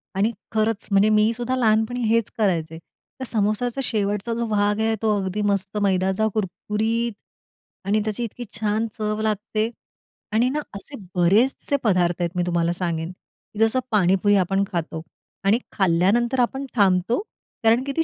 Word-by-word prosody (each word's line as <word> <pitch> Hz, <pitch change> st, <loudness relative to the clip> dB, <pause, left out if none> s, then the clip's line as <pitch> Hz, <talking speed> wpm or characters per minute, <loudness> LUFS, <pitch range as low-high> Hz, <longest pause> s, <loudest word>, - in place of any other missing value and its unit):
आणि 210 Hz, +4 st, +2 dB, 0.2 s
खरंच 220 Hz, -1 st, 0 dB
म्हणजे 200 Hz, +2 st, +4 dB
मी 215 Hz, +1 st, +4 dB
सुद्धा 245 Hz, +2 st, -2 dB
लहानपणी 225 Hz, +1 st, +2 dB
हेच 230 Hz, -1 st, +2 dB
करायचे. 165 Hz, -6 st, 0 dB
त्या 260 Hz, +9 st, -12 dB
सामोस्याचा 225 Hz, +4 st, 0 dB
शेवटचा 210 Hz, 0 st, -1 dB
जो 235 Hz, 0 st, -1 dB
भाग 205 Hz, 0 st, +1 dB
आहे 220 Hz, 0 st, +1 dB
तो 215 Hz, -2 st, +2 dB
अगदी 190 Hz, +2 st, -2 dB
मस्त 200 Hz, +1 st, -1 dB
मैदाचा 190 Hz, +2 st, +2 dB
कुरकुरीत 220 Hz, +3 st, -1 dB, 0.7 s
आणि 210 Hz, +2 st, +2 dB
त्याची 215 Hz, +2 st, -2 dB
इतकी 240 Hz, +2 st, -6 dB, 0.2 s
छान 215 Hz, +1 st, 0 dB
चव 215 Hz, 0 st, -2 dB
लागते 215 Hz, +1 st, -1 dB, 0.6 s
आणि 235 Hz, +4 st, +3 dB
ना, 300 Hz, +3 st, -1 dB, 0.2 s
असे 275 Hz, +8 st, -9 dB, 0.2 s
बरेचसे 210 Hz, +11 st, +3 dB
पदार्थ 180 Hz, -4 st, +2 dB
आहेत 170 Hz, -1 st, 0 dB
मी 175 Hz, -, +2 dB
तुम्हाला 170 Hz, -1 st, +1 dB
सांगेन, 170 Hz, -1 st, -3 dB
की 205 Hz, +3 st, -17 dB
जसं 225 Hz, +3 st, +3 dB
पाणीपुरी 200 Hz, 0 st, +3 dB
आपण 195 Hz, +1 st, +2 dB
खातो 165 Hz, -2 st, -3 dB, 0.4 s
आणि 210 Hz, +5 st, +3 dB
खाल्ल्यानंतर 200 Hz, +8 st, +2 dB
आपण 265 Hz, +3 st, 0 dB
थांबतो. 195 Hz, -, +3 dB, 0.4 s
कारण 230 Hz, +3 st, +4 dB
की 280 Hz, -, -3 dB
ती 325 Hz, -, +4 dB
210 Hz, 155 wpm, -23 LUFS, 190-230 Hz, 0.7 s, म्हणजे